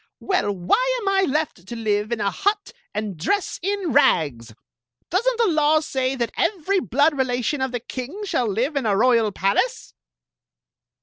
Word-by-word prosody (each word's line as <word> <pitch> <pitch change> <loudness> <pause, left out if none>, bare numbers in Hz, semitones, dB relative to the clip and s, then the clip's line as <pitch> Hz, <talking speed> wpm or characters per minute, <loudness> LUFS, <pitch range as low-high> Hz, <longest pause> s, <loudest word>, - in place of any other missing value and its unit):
" - - -62
Well, 370 - 0
why 475 - +1
am 420 - -6
I 385 -6 +2
left 295 - -2
to 235 - -6
live 215 -1 -1
in 235 - -1
a 200 -1 0
hut 405 +1 -1 0.2
and 210 -2 -4
dress 365 - -1
in 390 -2 -1
rags? 140 - +2 0.6
Does 380 +8 +1
n't - - -6
the 465 - +3
law 310 -2 +3
say 265 -3 -2
that 235 -3 -2
every 390 0 0
blood 285 - +2
relation 260 +1 -1
of 265 -1 -1
the 245 - -2
king 265 - -6
shall 250 - 0
live 240 +9 -1
in 270 -5 0
a 200 -2 +2
royal 230 -2 +3
palace 200 - -1
265 Hz, 180 wpm, -22 LUFS, -, 0.6 s, the